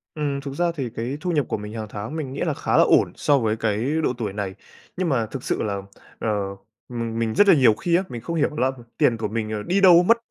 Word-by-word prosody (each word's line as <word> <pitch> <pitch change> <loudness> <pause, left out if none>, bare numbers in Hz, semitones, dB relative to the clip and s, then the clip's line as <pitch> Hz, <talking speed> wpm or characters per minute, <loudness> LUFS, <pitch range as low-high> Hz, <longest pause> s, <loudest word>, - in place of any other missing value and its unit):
Ừm, 145 -2 -2
thực 140 -1 -6
ra 175 +4 +1
thì 135 -6 -3
cái 120 +5 -4
thu 180 - -1
nhập 150 -5 +1
của - - -2
mình 105 +1 -8
hàng 110 -2 -5
tháng 110 +7 -6
mình 145 -5 -4
nghĩ 140 - -5
là 160 - 0
khá - - 0
là - - +7
ổn - - +4
so 145 - +2
với 110 -2 0
cái 115 +6 -1
độ 125 - +1
tuổi 105 -5 -3
này, 100 -2 -4 0.4
nhưng 180 -2 0
mà 125 -6 +1
thực 120 +4 -7
sự - - -1
là, 100 -2 -2 0.4
ờ, 115 - -1 0.6
mình 115 -2 -3
mình 115 -1 -1
rất 205 - +5
là - - +8
nhiều 130 -8 +5
khi 170 +11 0
á, 185 - +2
mình 120 - -6
không 170 +8 -4
hiểu 155 - +2
đó 150 - -11
là 130 -1 +2 0.3
tiền 115 - +3
của 110 - -2
mình, 110 0 -3
ờ, 105 -1 -3
đi 190 - +1
đâu 180 -2 +8
mất. 230 +6 +4
125 Hz, 280 wpm, -23 LUFS, 110-155 Hz, 0.6 s, là